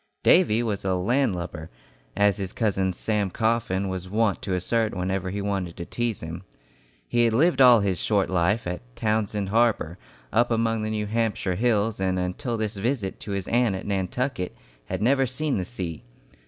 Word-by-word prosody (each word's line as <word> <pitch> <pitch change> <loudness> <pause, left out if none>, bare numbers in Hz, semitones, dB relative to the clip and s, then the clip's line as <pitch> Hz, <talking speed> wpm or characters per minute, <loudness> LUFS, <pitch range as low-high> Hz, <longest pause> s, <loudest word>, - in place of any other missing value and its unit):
Davy 120 -11 +5
was 105 -4 -2
a 95 -1 +1
"landlubber," 90 - -1 0.5
as 100 -2 +3
his 95 -2 -4
cousin 95 -4 +1
Sam 105 +2 -1
Coffin 110 -2 0
was 95 -1 -4
wont 105 0 +1
to 95 - -2
assert 110 +4 0
whenever 95 0 -2
he 100 +2 -3
wanted 95 -4 -2
to 85 - -5
tease 120 +1 -2
him. 80 +2 -6 0.7
He 120 0 +3
had 115 -1 +2
lived 160 +3 +3
all 125 -4 +8
his 95 -3 0
short 100 -3 +1
life 95 +5 +1
at 90 0 -3
Townsend 105 -3 -1
Harbor, 110 -6 +1 0.3
up 120 +1 +3
among 115 -1 +1
the 110 - -2
New 105 -1 -1
Hampshire 110 -3 -1
hills, 110 0 +1
and 95 -1 0
until 105 +7 -2
this 110 -2 -3
visit 110 -2 -2
to 100 - -5
his 100 -2 -3
aunt 120 -4 +2
at 95 - -6
Nantucket, 100 +1 -2 0.3
had 95 +8 -3
never 135 +2 +3
seen 140 +3 -1
the 90 - -2
sea. 90 -7 -6
105 Hz, 180 wpm, -25 LUFS, 95-115 Hz, 0.7 s, all